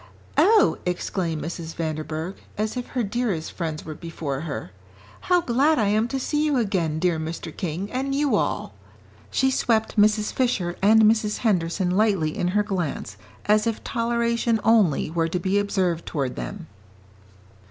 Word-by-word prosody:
"Oh!" 430 0 +5
exclaimed 175 -2 -2
Mrs. 165 0 -6
Vanderburgh, 160 +2 -3 0.2
as 215 +2 -1
if 250 -1 -4
her 250 - -2
dearest 205 -6 -2
friends 160 -3 -4
were 155 - -5
before 155 -4 -5
her, 140 - -5 0.6
"how 360 -1 +5
glad 285 +3 +2
I 215 -4 +2
am 215 +2 +2
to 270 +2 -3
see 295 +3 0
you 295 -3 +2
again, 185 -9 0
dear 170 -1 +1
Mr. 160 0 -5
King, 180 +4 -4
and 270 +2 -1
you 290 -1 +2
all." - - -1 0.6
She 265 0 +2
swept 220 -4 +1
Mrs. 215 0 +2
Fisher 195 -9 0
and 220 +3 +6
Mrs. 215 -1 +3
Henderson 180 -2 +1
lightly 190 -6 +2
in 175 - -1
her 210 +3 +2
glance 180 -7 -3 0.3
as 210 +2 +3
if 225 - -2
toleration 235 -1 0
only 210 -10 +3
were 165 0 +1
to 180 +2 -2
be 190 +3 +1
observed 185 -4 -1
toward 135 -5 -2
them. 200 -4 -6
200 Hz, 160 wpm, -24 LUFS, 165-230 Hz, 0.6 s, and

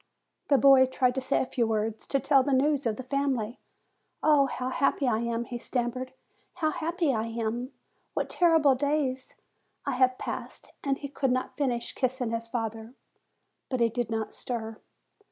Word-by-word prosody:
The 280 - +5
boy 270 -1 +7
tried 255 -1 +1
to 265 - -2
say 260 +2 +1
a - - -4
few 240 -2 0
words, 220 0 -2
to 275 - +1
tell 275 0 +4
the 275 +1 0
news 280 0 +2
of 220 - 0
the 260 - -7
family. 260 -4 -1 0.6
"Oh 295 -3 +5
how 255 -1 -3
happy 275 0 +1
I 220 -3 +2
am!" 235 0 -2
he 240 -1 -6
stam 240 0 -1
mered. 255 +1 -6 0.5
"How 310 -2 0
happy 330 -2 0
I 220 0 -1
am! 230 +3 -3 0.4
What - - 0
terrible 325 -5 +4
days 270 -1 -1 0.5
I 280 - 0
have 255 0 +3
passed!" - - -6
And 275 -1 0
he 285 - -6
could 270 -1 -1
not 255 0 -1
finish 245 -5 -1
kissing 255 -2 -1
his 230 0 -3
father. 225 0 -4 0.7
But 255 - -1
he 235 -1 +4
did 235 0 -2
not 220 -1 -3
stir. 225 -3 -5
255 Hz, 180 wpm, -28 LUFS, 235-275 Hz, 0.7 s, boy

